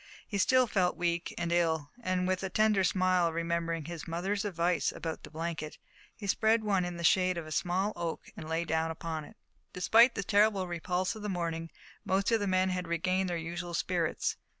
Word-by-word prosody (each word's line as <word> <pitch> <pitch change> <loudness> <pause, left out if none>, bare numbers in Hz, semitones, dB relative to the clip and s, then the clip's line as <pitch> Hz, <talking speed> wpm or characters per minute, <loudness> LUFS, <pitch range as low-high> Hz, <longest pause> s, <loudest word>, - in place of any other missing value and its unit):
He 200 - -2
still 255 +5 +5
felt 185 -5 +1
weak, 170 0 -1
and 170 -1 -2
ill, 160 -4 +1
and, 185 -3 0
with 185 0 0
a 190 - -2
tender 215 0 +3
smile, 185 -2 +2
remembering 165 -1 -2
his 170 -1 -7
mother's 190 +5 -1
advice 175 -5 0
about 160 -1 -5
the - - -10
blanket, 160 -1 -4 0.4
he 210 - -8
spread 220 +3 +2
one 195 -3 +2
in 175 -1 -5
the 170 - -5
shade 185 +1 +3
of 170 - -4
a 155 - -9
small 180 +8 0
oak 170 -1 -3
and 155 -1 -8
lay 165 +1 0
down 160 0 0
upon 160 -1 -4
it. - - -16 0.4
Despite 230 +7 +5
the 200 - -2
terrible 205 -1 +3
repulse 180 +2 -1
of 215 - -8
the 210 - -3
morning 165 -3 -3 0.3
most 195 +3 +1
of 225 - +4
the 205 - -1
men 185 0 +2
had 180 -1 -2
regained 185 +3 0
their 175 - -1
usual 170 +1 -4
spirits. 170 -3 -1
175 Hz, 200 wpm, -31 LUFS, 165-190 Hz, 0.4 s, still